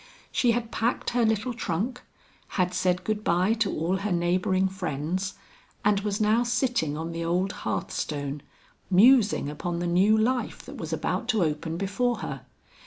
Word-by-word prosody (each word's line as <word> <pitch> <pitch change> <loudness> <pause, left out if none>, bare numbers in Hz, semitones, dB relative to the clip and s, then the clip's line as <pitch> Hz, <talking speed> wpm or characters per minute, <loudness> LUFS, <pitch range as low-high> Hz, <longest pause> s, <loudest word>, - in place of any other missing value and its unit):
She 245 - +2
had 230 -1 -2
packed 235 +2 -1
her 240 -1 +2
little 220 +2 +1
trunk, 230 +3 -2 0.6
had 180 -1 +1
said 180 0 +1
good 215 +1 -2
bye 180 +4 +2
to 225 -3 0
all 170 +4 0
her 200 +1 -3
neighboring 180 +2 +2
friends 185 0 -3 0.5
and 205 -1 +4
was 205 0 -2
now 215 +2 +3
sitting 240 - 0
on 165 +1 -4
the 165 0 -4
old 180 +3 0
hearthstone, 140 +7 -3 0.5
musing 210 - +5
upon 170 +4 -3
the 175 - -2
new 190 +5 +4
life 245 +3 0
that - - -9
was - - -5
about - - -2
to 215 -4 +2
open 160 +1 -2
before 200 +6 0
her. - - -5
190 Hz, 165 wpm, -27 LUFS, 170-220 Hz, 0.6 s, musing